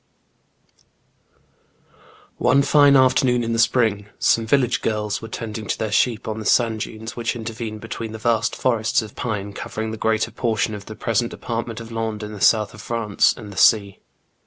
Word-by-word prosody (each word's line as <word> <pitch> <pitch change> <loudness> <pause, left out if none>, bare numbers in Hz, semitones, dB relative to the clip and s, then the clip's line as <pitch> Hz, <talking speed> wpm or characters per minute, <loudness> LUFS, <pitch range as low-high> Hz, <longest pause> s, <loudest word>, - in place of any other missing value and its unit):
One 140 - +4
fine 145 0 +5
afternoon 130 -2 +3
in 115 0 -2
the 115 - 0
spring, 110 -3 +2
some 115 -1 +2
village 125 0 +2
girls 105 -2 -2
were 115 - -7
tending 110 -1 -6
their 110 -2 -3
sheep 110 +1 +1
on 110 0 -3
the 110 - -7
sand 115 -3 +2
dunes 110 +1 -6
which 115 0 -2
intervene 115 -1 -5
between 115 0 -6
the 110 - -6
vast 115 0 0
forests 115 -2 +1
of 110 - -11
pine 105 -4 -4
covering 110 +2 -5
the 110 - -5
greater 110 +1 0
portion 110 -2 -1
of 100 -1 -8
the 110 - -8
present 115 +2 0
department 115 -1 -5
of 115 0 -10
Landes 110 -2 -3
in 105 - -8
the 105 - -9
south 105 +4 +3
of 110 - -11
France, 115 -2 +1
and 105 -3 -9
the - - -13
sea. 100 -2 +4
110 Hz, 180 wpm, -22 LUFS, 110-115 Hz, -, fine